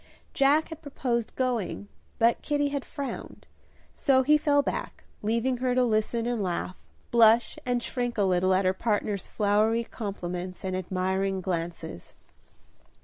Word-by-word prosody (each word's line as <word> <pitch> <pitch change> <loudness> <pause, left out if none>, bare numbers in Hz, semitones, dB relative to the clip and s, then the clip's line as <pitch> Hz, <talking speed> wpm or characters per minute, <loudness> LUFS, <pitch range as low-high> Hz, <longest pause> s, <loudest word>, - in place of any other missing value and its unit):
Jack 290 +3 +3
had 320 -1 -8
proposed 250 -6 -2
going, 240 -6 -2 0.3
but 230 +1 +3
Kitty 290 -1 0
had 280 -1 -3
frowned, 280 -2 -7 0.5
so 265 -3 +3
he 300 +3 +5
fell 290 -1 +3
back, - - -4 0.2
leaving 235 +4 0
her 250 0 0
to 255 - +4
listen 225 0 0
and 240 -2 -1
laugh, 185 0 -2 0.4
blush 230 0 +5
and 245 -1 0
shrink 245 -2 -2
a 205 - +3
little 185 0 +3
at 190 +1 +1
her 185 - +3
partner's 205 -2 -1
flowery 215 +2 +2
compliments 185 -5 -5
and 185 -1 -2
admiring 190 +1 -1
glances. 170 - -5
225 Hz, 145 wpm, -27 LUFS, 190-255 Hz, 0.5 s, he